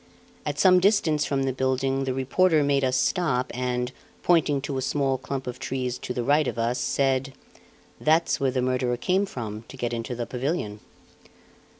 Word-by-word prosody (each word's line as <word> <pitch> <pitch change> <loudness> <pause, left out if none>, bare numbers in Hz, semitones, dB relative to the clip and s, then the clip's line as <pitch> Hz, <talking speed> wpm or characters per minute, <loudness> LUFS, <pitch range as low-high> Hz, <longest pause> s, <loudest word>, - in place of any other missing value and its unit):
At - - -2
some 185 -1 +6
distance 175 -7 +2
from 135 -1 0
the 135 -1 0
building 135 +1 0
the 130 - -1
reporter 155 +4 +3
made 140 -1 +2
us 130 0 +2
stop 130 -9 +1
and, 125 0 -2 0.3
pointing 160 -5 +3
to 135 -1 -3
a - - -3
small 135 0 0
clump 135 0 -4
of 125 0 -6
trees 125 -2 -3
to - - -6
the 125 -1 -2
right 145 +2 +3
of - - -3
us, 115 +2 0
said: 135 0 0 0.7
"That's 160 +2 +2
where 135 -2 +2
the 130 -1 -1
murderer 125 -1 0
came 190 +9 +1
from 110 - -6
to 135 - -11
get 120 -1 -2
into 115 +1 -3
the 120 0 -3
pavilion." 125 -5 -3
135 Hz, 185 wpm, -25 LUFS, 125-145 Hz, 0.7 s, some